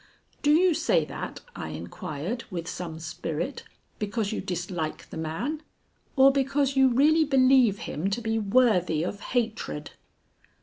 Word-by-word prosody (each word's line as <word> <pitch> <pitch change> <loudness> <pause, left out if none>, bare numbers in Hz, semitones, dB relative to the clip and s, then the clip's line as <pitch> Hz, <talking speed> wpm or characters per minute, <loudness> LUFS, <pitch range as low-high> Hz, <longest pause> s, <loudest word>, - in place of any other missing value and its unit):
"Do 290 - +2
you 350 +3 +5
say - - +2
that," - - -6
I - - -5
inquired, 175 - -5
with 170 -4 -5
some 170 -4 -5
spirit, 160 - -4 0.3
"because 210 0 -2
you - - -2
dislike 175 -3 -4
the - - -7
man, 205 - -3 0.5
or 270 0 +7
because 275 0 +1
you 265 0 +6
really 300 +6 +4
believe 260 -6 +4
him 180 +2 -3
to 200 - -1
be 225 -1 -1
worthy 200 -7 +3
of 200 +3 -4
hatred?" 220 -10 -2
225 Hz, 140 wpm, -27 LUFS, 175-270 Hz, 0.5 s, or